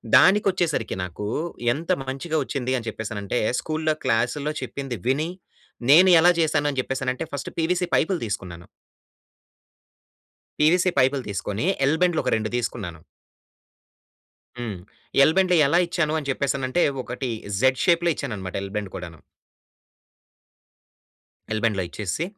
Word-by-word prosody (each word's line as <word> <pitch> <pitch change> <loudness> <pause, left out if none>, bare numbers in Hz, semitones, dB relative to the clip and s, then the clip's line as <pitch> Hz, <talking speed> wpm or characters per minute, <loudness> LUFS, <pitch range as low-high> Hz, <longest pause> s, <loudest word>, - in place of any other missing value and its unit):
దానికి 205 +2 +6
వచ్చేసరికి 165 - -1
నాకు 90 +3 -6 0.5
ఎంత 165 +6 -7 0.2
మంచిగా 155 +5 -2
వచ్చింది 130 -1 -2
అని 115 -1 -6
చెప్పేసనంటే 105 0 -3 0.2
స్కూల్‌లో, 155 0 -1
క్లాసుల్లో 125 +6 0
చెప్పింది 135 -4 -5
విని. 145 +5 +1 0.6
నేను 180 +5 +8
ఎలా 175 +1 +7
చేశాను 150 -2 +1
అని 135 - -3
చెప్పేసానంటే 130 +2 -2
ఫస్ట్ 140 - -4
పీవీసీ 180 +2 +1
పైపులు 180 +2 +1
తీసుకున్నాను... 90 -5 -6 1.9
పీవీసీ 175 +4 +4
పైపులు 130 +1 +3
తీసుకొని 105 - -3 0.2
ఎల్ 155 +3 +2
బెండ్లు 175 -3 +2
ఒక - - +1
2 110 0 -2
తీసుకున్నాను. 100 -8 -4 1.6
హ్మ్. 110 -6 -4 0.5
ఎల్ 160 - +3
బెండ్లు 185 -2 +4
ఎలా 165 +5 +3
ఇచ్చాను 170 -3 0
అని 145 - -5
చెప్పేసి 140 +1 0
అనంటే 130 +7 0 0.2
ఒకటి 125 0 -4 0.3
జెడ్ 130 +1 +3
షేప్‌లో 175 -1 +3
ఇచ్చాను 125 -6 -4
అన్నమాట 95 -1 -6
ఎల్ 100 - -7
బెన్డ్ 100 -3 -3
కూడాను... 85 -4 -8 2.3
ఎల్ 110 - -2
బెండ్లు 105 -4 +1
ఇచ్చేసి, 105 - -3
135 Hz, 130 wpm, -24 LUFS, 110-160 Hz, 2.3 s, నేను